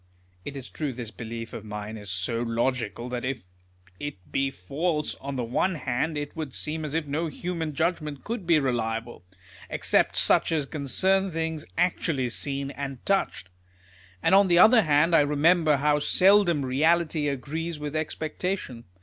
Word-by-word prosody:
" 90 0 -35
It 140 -1 -6
is 130 - -7
true 150 -4 -4
this 115 -2 -7
belief 115 0 -7
of 110 - -6
mine 105 0 -6
is 105 -2 -8
so 95 +5 -1
logical, 120 -1 -1
that 125 -1 -4
if 130 -3 -3 0.6
it 140 -12 -7
be 135 0 +1
false, 150 - -2
on 140 0 -5
the 125 - -1
one 150 +11 0
hand 150 +2 -2
it 145 -1 -5
would 155 -5 -5
seem 155 +1 -3
as 150 0 -4
if 165 -1 0
no 150 +4 -2
human 160 0 -4
judgment 155 -3 -1
could 220 -6 -5
be 170 -2 +5
reliable, 115 - -2 0.5
except - - +2
such - - +4
as 155 -3 +1
concern 190 +7 +1
things 160 -2 -3
actually 165 -7 +1
seen, 140 +2 -1
and 135 -2 -6
touched; 195 - 0 0.7
and - - +3
on 195 0 +7
the 175 -1 +4
other 220 +5 +8
hand, 155 +1 +3
I - - +7
remember 150 +2 +3
how 150 +1 +2
seldom 180 -2 +4
reality 155 +3 +2
agrees 150 +4 -3
with 150 0 -5
expectation. 155 -4 -3
145 Hz, 165 wpm, -26 LUFS, 125-165 Hz, 0.7 s, other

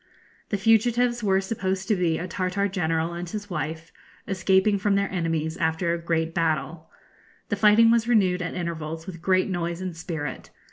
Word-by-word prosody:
The 205 - 0
fugitives 235 +3 +2
were 190 -2 +3
supposed 190 -2 -3
to 215 - +3
be 170 -3 +1
a 180 - -4
Tartar 185 +2 -1
general 165 -3 -1
and 175 0 -5
his 205 +1 -6
wife, 160 -1 -4 0.4
escaping 190 +2 +2
from 200 +1 +1
their 200 0 0
enemies 165 -3 -1
after 165 +2 0
a 170 - -2
great 165 -1 -1
battle. 160 -1 -1 0.6
The - - +1
fighting 220 +2 +6
was 230 0 +2
renewed 190 -6 +3
at 180 - -4
intervals 165 -2 -4
with 170 -4 -8
great 185 0 +2
noise 170 -2 -2
and 185 -2 -5
spirit. 160 -2 -5
180 Hz, 175 wpm, -25 LUFS, 165-200 Hz, 0.6 s, fighting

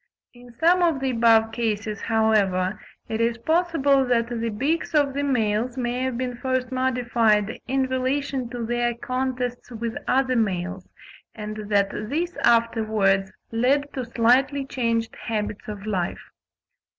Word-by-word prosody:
In 245 0 -15
some 350 +2 +4
of 330 -5 +2
the 265 -1 0
above 225 -2 +4
cases, 215 -3 -2
however, 210 -4 +1 0.3
it 220 0 -2
is 230 0 +1
possible 300 -1 +2
that 235 -2 +1
the 230 -1 -2
beaks 290 +10 -1
of 285 -2 +3
the 285 - -1
males 235 -3 0
may 245 0 -1
have 260 -2 -1
been 250 -1 -3
first 260 0 -1
modified 240 -5 +1
in 265 +1 +1
relation 260 0 -1
to 240 -1 -4
their 240 0 0
contests 255 -1 -3
with 230 -1 -4
other 260 -1 +2
males; 190 -4 -1 0.5
and 215 -1 -6
that 200 -1 +2
this 320 +12 -3
afterwards 215 -4 +2 0.2
led 275 +5 +1
to 260 - -3
slightly 255 +4 +2
changed 230 -4 -1
habits 210 -2 -3
of 205 -1 -7
life. 190 -5 -3
240 Hz, 140 wpm, -24 LUFS, 220-260 Hz, 0.5 s, some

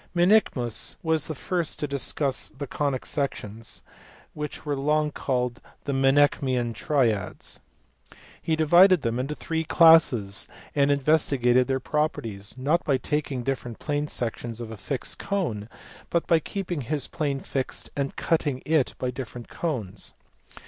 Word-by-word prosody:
Menaechmus 175 - +2
was 160 -3 +1
the 155 - -4
first 175 +3 -2
to - - -2
discuss 140 0 0
the 140 +1 -7
conic 140 -1 -2
sections, 115 -6 -4 0.5
which 150 0 -6
were 145 -1 0
long 150 +2 +1
called 125 -3 -2 0.2
the 140 - -2
Menaechmian 135 -3 +3
triads. 115 - -1 0.8
He 160 - +1
divided 175 +2 +6
them 115 +1 0
into 140 +4 -2
three 160 +1 -2
classes, 155 - +5 0.3
and 140 -1 +3
investigated 135 -4 +3
their 135 -1 0
properties, 115 -8 -2
not 150 +7 +1
by 140 -3 +2
taking 145 -3 -2
different 125 -3 -3
plane 145 0 -2
sections 120 -3 -4
of 115 -2 -6
a - - -6
fixed 125 +7 -4
cone, 120 - -2 0.4
but 170 - +1
by 165 -2 +4
keeping 175 -2 -4
his 145 +1 -2
plane 145 -4 -2
fixed 135 -1 -4
and 140 -1 -2
cutting 145 -5 0
it 155 -4 +2
by 125 - -2
different 125 -2 -7
cones. 120 - -4
140 Hz, 140 wpm, -26 LUFS, 125-155 Hz, 0.8 s, divided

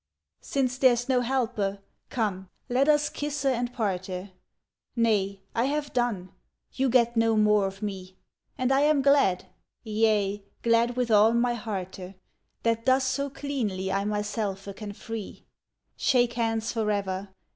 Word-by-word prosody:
Since 255 -2 -1
there's 245 -2 +4
no 255 -2 +2
helpe, 235 -6 -1 0.3
come, 195 -6 -2 0.2
let 265 +4 +2
us 295 0 +4
kisse 290 -1 -4
and 245 -2 +1
parte, 190 -4 -3 0.6
Nay, 200 -4 +1
I 230 +1 +1
have 290 +1 -2
done, 225 -7 -1 0.4
you 265 0 +1
get 235 -1 +3
no 225 -1 +3
more 210 -2 +4
of 195 +2 -8
me; 190 -2 -5 0.4
And 255 +1 0
I 270 - +4
am 295 -2 +3
glad, 275 -10 +3 0.4
yea, 210 -2 +1 0.2
glad 235 +1 +3
with 245 -2 0
all 215 +2 +6
my 240 +1 +2
hearte, 195 -4 -6 0.5
That 230 +1 0
thus 260 +1 +4
so 280 +2 -1
cleanly 225 -10 -3
I 195 +1 0
myselfe 205 -2 -3
can 210 -1 -7
free. 225 0 -7 0.5
Shake 245 -3 +2
hands 225 -1 -1
forever! 200 -3 -1
225 Hz, 140 wpm, -27 LUFS, 200-250 Hz, 0.6 s, all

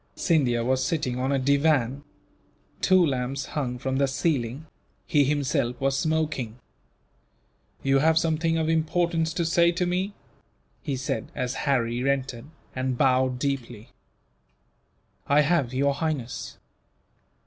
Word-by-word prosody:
Scindia 125 -9 +1
was 130 +1 +1
sitting 130 -4 -1
on 130 +2 0
a 140 - +2
divan. 140 -1 +2 0.8
Two 185 -2 +5
lamps 135 -1 -2
hung 125 -4 -2
from 130 +1 -2
the 140 - +3
ceiling. 135 -1 -1 0.4
He 145 -2 +3
himself 130 -4 0
was 135 0 +1
smoking. 155 -7 -1 1.3
"You 135 0 +3
have 160 +2 +3
something 165 0 +1
of 160 -1 0
importance 165 0 +1
to 170 - 0
say 170 +1 +4
to 180 +1 0
me?" 185 +3 -1 0.7
he 140 -4 -3
said, 135 +2 -3
as 125 0 -2 0.2
Harry 125 0 +1
entered, 130 -3 -2 0.3
and 130 -1 -1
bowed 130 -1 +2
deeply. 125 -4 -4 1.4
"I 145 +2 +5
have, 150 -5 +1
Your 140 +2 +1
Highness. 145 -5 -4
140 Hz, 125 wpm, -26 LUFS, 130-160 Hz, 1.4 s, Two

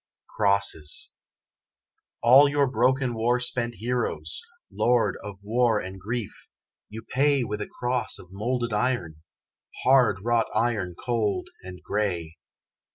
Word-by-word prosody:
CROSSES 100 -7 0 1.1
All 135 +4 +8
your 145 0 +2
broken 130 0 +1
war 120 +2 +1
spent 120 -1 -2
heroes, 115 -8 -3 0.3
Lord 120 -1 +2
of 100 -1 -7
War 115 +1 +2
and 95 0 -7
Grief 115 +2 -5 0.4
you 110 +2 -8
pay 140 +2 +2
With 105 -2 -4
a - - -4
cross 125 -1 -1
of 90 - -14
moulded 120 +3 -2
iron, 105 -9 -1 0.6
Hard 125 -7 +4
wrought 120 -1 +2
iron 110 -6 0
cold 115 -3 -1
and 90 0 -10
grey. 85 -6 -2
115 Hz, 120 wpm, -26 LUFS, 100-125 Hz, 1.1 s, All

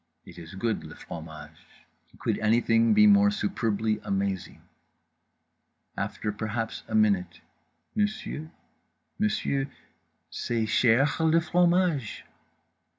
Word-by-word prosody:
It - - -12
is 85 +2 -10
good, 110 +3 -2
le - - -10
fromage. 80 -2 -11 0.3
Could - - -1
anything 115 - +3
be 215 0 +7
more 205 0 +6
superbly 110 - -1
amazing? 100 -2 -3 1.3
After 105 - -3
perhaps 110 +2 -4
a 110 - -3
minute 100 -5 +1 0.5
"_monsieur—monsieur—c'est 135 - -4
chèr 130 +8 +3
le 165 - +5
fromage? 175 - +1
115 Hz, 90 wpm, -27 LUFS, 105-160 Hz, 1.3 s, be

